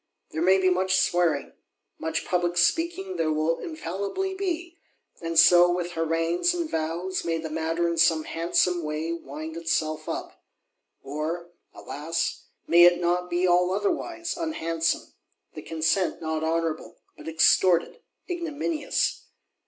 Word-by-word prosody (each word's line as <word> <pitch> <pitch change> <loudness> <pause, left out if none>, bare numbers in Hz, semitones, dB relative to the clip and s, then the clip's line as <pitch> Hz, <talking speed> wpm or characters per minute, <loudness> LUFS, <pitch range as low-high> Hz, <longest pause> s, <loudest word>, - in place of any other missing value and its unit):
There 160 - -3
may 190 +2 +5
be 185 -1 +3
much 185 +1 +2
swearing; 175 -5 +1 0.5
much 160 0 -2
public 175 -1 0
speaking 195 - +1
there 160 -1 +1
will 155 +2 0
infallibly 315 - -4
be: 350 -3 -4 0.4
and 165 -1 -3
so, 175 +1 +7
with 175 0 -2
harangues 165 - 0
and 340 -2 -2
vows, 170 - -2
may 165 -1 -1
the 160 -1 -6
matter 165 +2 -1
in 170 -1 -1
some 165 -1 +4
handsome 175 +2 0
way, 155 +1 -3
wind 160 0 -6
itself 155 -2 -2
up. - - -6 0.6
Or, 160 +4 -4 0.2
alas, 165 +3 -4 0.2
may 170 +1 +5
it 175 0 +5
not 175 +1 0
be 175 +1 +1
all 180 0 +3
otherwise, 335 - -2
unhandsome: 165 - -2 0.4
the - - -8
consent 165 +4 0
not 160 -1 -3
honourable, 160 0 -2 0.2
but - - -12
extorted, 170 - +3 0.3
ignominious? 325 -3 -2
170 Hz, 135 wpm, -26 LUFS, 160-190 Hz, 0.6 s, so